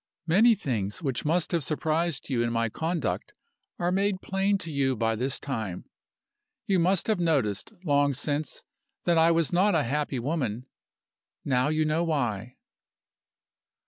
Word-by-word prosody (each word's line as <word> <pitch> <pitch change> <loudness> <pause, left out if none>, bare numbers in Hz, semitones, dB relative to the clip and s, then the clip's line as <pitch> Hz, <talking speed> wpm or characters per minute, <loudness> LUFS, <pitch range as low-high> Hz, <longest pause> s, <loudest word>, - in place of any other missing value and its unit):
Many 215 +8 +5
things 110 - -3
which 135 -2 -2
must 165 +2 +1
have 170 -4 +1
surprised 155 +1 -1
you 125 -4 0
in 120 0 0
my 115 0 0
conduct 165 +8 -3 0.4
are 175 +1 0
made 195 0 +1
plain 195 +1 0
to 165 -4 -6
you 135 -2 +1
by 115 0 0
this 130 +4 -2
time. 110 -10 -4 0.8
You 190 -2 +2
must 185 +2 +2
have 215 -4 +1
noticed 140 - 0
long 145 -3 +2
since 145 +2 -2 0.4
that 170 -2 +3
I 165 +1 +5
was 165 0 +1
not 190 +2 +3
a 155 - +3
happy 145 +1 -1
woman. 125 -3 -2 0.8
Now 130 0 +2
you 155 0 +1
know 155 +2 +1
why. 125 - -2
150 Hz, 150 wpm, -27 LUFS, 125-170 Hz, 0.8 s, Many